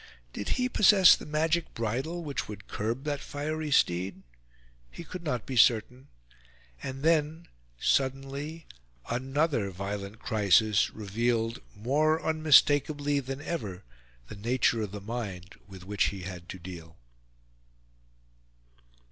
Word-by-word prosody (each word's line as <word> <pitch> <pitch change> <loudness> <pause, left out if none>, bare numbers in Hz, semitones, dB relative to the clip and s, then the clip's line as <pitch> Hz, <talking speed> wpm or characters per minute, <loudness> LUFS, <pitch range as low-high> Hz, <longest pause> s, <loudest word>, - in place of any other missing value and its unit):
Did 100 - -4
he 250 0 +1
possess 200 -6 +7
the - - -10
magic 160 +2 0
bridle 130 +10 -2
which 145 -3 -4
would 105 -1 -9
curb 115 +5 -3
that 145 -2 -2
fiery 155 +2 -4
steed? 95 -6 +1 0.7
He 170 - -9
could 180 +2 -8
not 125 -9 -3
be 130 - -5
certain. 120 +2 +3 0.7
And 135 +1 -6
then, 160 +1 +1 0.3
suddenly, 140 - -1 0.5
another 135 -2 0
violent 100 +2 -5
crisis 105 -1 +3
revealed 115 +3 -1
more 150 +9 +1
unmistakably 145 -2 +3
than 135 +1 -5
ever 105 - -5 0.4
the - - -9
nature 115 +2 +1
of 105 -3 -4
the 100 0 -7
mind 100 -4 -6
with 95 -2 -11
which 100 0 +1
he 100 -2 -3
had 90 -2 -8
to - - -6
deal. 85 -2 -10
125 Hz, 120 wpm, -29 LUFS, 105-150 Hz, 0.7 s, possess